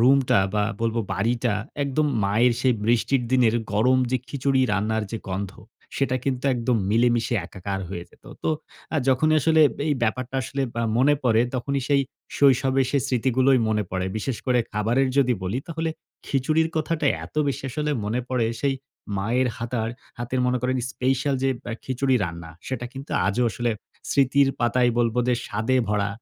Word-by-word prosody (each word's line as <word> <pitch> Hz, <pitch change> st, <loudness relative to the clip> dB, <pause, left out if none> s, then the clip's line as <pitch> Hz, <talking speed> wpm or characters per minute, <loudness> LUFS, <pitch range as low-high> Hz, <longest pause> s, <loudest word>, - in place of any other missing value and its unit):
রুমটা 130 Hz, -2 st, +4 dB, 0.2 s
বা 105 Hz, -1 st, +2 dB, 0.2 s
বলবো 115 Hz, 0 st, 0 dB
বাড়িটা 115 Hz, +3 st, 0 dB, 0.3 s
একদম 140 Hz, +2 st, +1 dB, 0.2 s
মায়ের 115 Hz, +5 st, +3 dB
সেই 125 Hz, -2 st, +3 dB
বৃষ্টির 120 Hz, +3 st, +2 dB
দিনের 120 Hz, -3 st, +4 dB, 0.2 s
গরম 125 Hz, +5 st, +3 dB
যে 130 Hz, -, +3 dB
খিচুড়ি 135 Hz, +1 st, +1 dB
রান্নার 110 Hz, +2 st, 0 dB
যে 115 Hz, -, -2 dB
গন্ধ, 95 Hz, +1 st, -3 dB, 0.4 s
সেটা 135 Hz, -2 st, +1 dB
কিন্তু 130 Hz, -1 st, -1 dB
একদম 120 Hz, 0 st, +1 dB
মিলেমিশে 120 Hz, +1 st, +2 dB
একাকার 95 Hz, 0 st, -5 dB
হয়ে 85 Hz, -2 st, -5 dB
যেত। -, -, -25 dB, 0.2 s
তো -, -, 0 dB, 0.5 s
আ -, -, +3 dB
যখনই 155 Hz, +4 st, +3 dB
আসলে 160 Hz, +2 st, +4 dB, 0.3 s
এই 145 Hz, -, +3 dB
ব্যাপারটা 130 Hz, +3 st, -1 dB
আসলে 135 Hz, +2 st, -3 dB, 0.2 s
আ -, -, 0 dB, 0.2 s
মনে 145 Hz, +3 st, +5 dB
পড়ে, 115 Hz, -2 st, +3 dB
তখনই 135 Hz, +3 st, -1 dB
সেই 140 Hz, -1 st, +4 dB, 0.4 s
শৈশবে 135 Hz, -1 st, +4 dB
সে 140 Hz, -, +2 dB
স্মৃতিগুলোই 130 Hz, +1 st, +3 dB
মনে 105 Hz, -1 st, +1 dB
পড়ে। 95 Hz, 0 st, -1 dB
বিশেষ 115 Hz, +2 st, -2 dB
করে 125 Hz, -1 st, +3 dB
খাবারের 115 Hz, +6 st, +1 dB
যদি 125 Hz, -2 st, +4 dB
বলি, 95 Hz, +7 st, -1 dB
তাহলে 160 Hz, 0 st, -2 dB, 0.4 s
খিচুড়ির 155 Hz, +4 st, +1 dB
কথাটা 155 Hz, 0 st, 0 dB, 0.2 s
এত -, -, -14 dB
বেশি 140 Hz, -, -2 dB
আসলে 150 Hz, +3 st, -2 dB
মনে 115 Hz, +4 st, -1 dB
পড়ে, 125 Hz, -3 st, +1 dB
সেই 140 Hz, -1 st, +1 dB, 0.4 s
মায়ের 120 Hz, +6 st, +1 dB
হাতার 115 Hz, -1 st, -2 dB, 0.3 s
হাতের 120 Hz, +2 st, -2 dB
মনে 125 Hz, 0 st, +1 dB
করেন 130 Hz, +1 st, +1 dB
স্পেশাল 135 Hz, +2 st, 0 dB
যে 135 Hz, -, +3 dB, 0.2 s
অ্যা 120 Hz, -, -4 dB
খিচুড়ি 130 Hz, 0 st, +1 dB
রান্না, 85 Hz, -1 st, -7 dB, 0.2 s
সেটা 130 Hz, -2 st, -3 dB
কিন্তু 135 Hz, +2 st, -9 dB, 0.2 s
আজও 105 Hz, +5 st, +1 dB
আসলে 120 Hz, +1 st, -1 dB, 0.4 s
স্মৃতির 140 Hz, 0 st, +4 dB
পাতায় 120 Hz, +1 st, +3 dB
বলবো 120 Hz, 0 st, +1 dB
যে 125 Hz, -, +4 dB
স্বাদে 110 Hz, +5 st, 0 dB
ভরা। 105 Hz, -1 st, +1 dB
125 Hz, 165 wpm, -24 LUFS, 115-135 Hz, 0.5 s, মনে